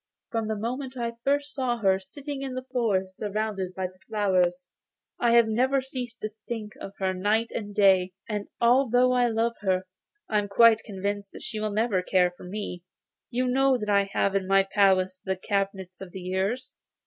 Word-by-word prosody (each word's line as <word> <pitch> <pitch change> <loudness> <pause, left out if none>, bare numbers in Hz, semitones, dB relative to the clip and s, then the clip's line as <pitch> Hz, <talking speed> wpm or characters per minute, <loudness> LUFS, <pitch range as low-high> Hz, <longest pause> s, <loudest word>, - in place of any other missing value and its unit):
From 225 -2 -1
the 220 - -1
moment 255 +4 -4
that 240 - -3
I 235 0 -3
first 285 +1 0
saw 255 -3 0
her, 190 -4 +2
sitting 275 +9 -7
in 265 -2 -4
the 255 0 -5
forest 190 -6 0
surrounded 205 -3 -3
by 190 -1 -2 0.2
flowers, 185 -4 +1 0.5
I 235 -1 +3
have 235 -1 +6
never 255 +5 +2
ceased 255 -2 -6
to 215 - -3 0.2
think 215 -3 -5
of 195 - -7
her 190 -1 0
night 210 +5 +1
and 205 -2 -5
day, 190 -2 +4
and, 210 -2 -3
although 250 +1 +4
I 250 -1 +3
love 230 +1 0
her, 185 -2 +1 0.4
I 210 - +2
am 205 - -2
quite 225 +2 +5
convinced 200 -1 -4
that - - -9
she 215 -1 -4
will 215 0 -1
never 210 -2 +1
care 180 -1 +2
for - - -12
me. 180 -2 -5 0.5
You 255 +1 0
know 265 +1 +3
that 210 -3 -4
I 200 -1 +4
have 200 0 +1
in 190 -1 0
my 195 0 +5
palace 190 -1 +2
the 190 0 -1
cabinets 195 -1 -3
of 185 -2 -9
the 190 - -6
years. 190 +7 -2
210 Hz, 195 wpm, -27 LUFS, 190-240 Hz, 0.5 s, have